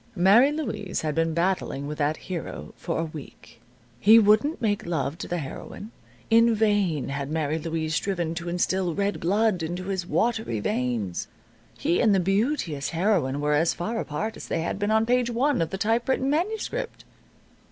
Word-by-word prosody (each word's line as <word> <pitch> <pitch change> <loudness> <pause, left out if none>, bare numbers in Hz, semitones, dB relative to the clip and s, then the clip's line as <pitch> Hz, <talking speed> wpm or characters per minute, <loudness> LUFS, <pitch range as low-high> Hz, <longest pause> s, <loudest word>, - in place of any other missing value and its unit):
Mary 210 +10 +6
Louise 295 -10 -3
had 155 -1 -1
been 165 +1 +1
battling 170 -5 -1
with 150 +1 -6
that 150 +1 +1
hero 180 -3 -6
for 165 - -3
a 165 - 0
week. 155 -2 -11 0.4
He 220 - +7
wouldn't 215 +8 +4
make 205 -5 -1
love 160 -3 -1
to - - -5
the 175 - -2
heroine. 170 +8 -7 0.4
In 230 0 +5
vain 205 - +1
had 140 0 -3
Mary 155 0 -1
Louise 160 -1 -3
striven 175 -2 -1
to 170 +1 -5
instill 180 0 0
red 200 0 -1
blood 200 +1 +1
into 175 +3 -3
his 185 -2 -3
watery 220 - 0
veins. 110 -5 -2 0.5
He 170 - +1
and 215 -4 +4
the - - +3
beauteous 195 - 0
heroine 165 -6 +1
were 150 0 +1
as 160 +3 +2
far 225 +6 -3
apart 215 +8 -3
as - - -9
they - - -1
had 170 +4 -3
been 205 0 0
on 220 +1 +3
Page 245 0 +2
One 255 0 +1
of 165 - 0
the 190 - -4
typewritten 240 +6 +1
manuscript. 440 +9 -2
185 Hz, 175 wpm, -25 LUFS, 160-220 Hz, 0.5 s, He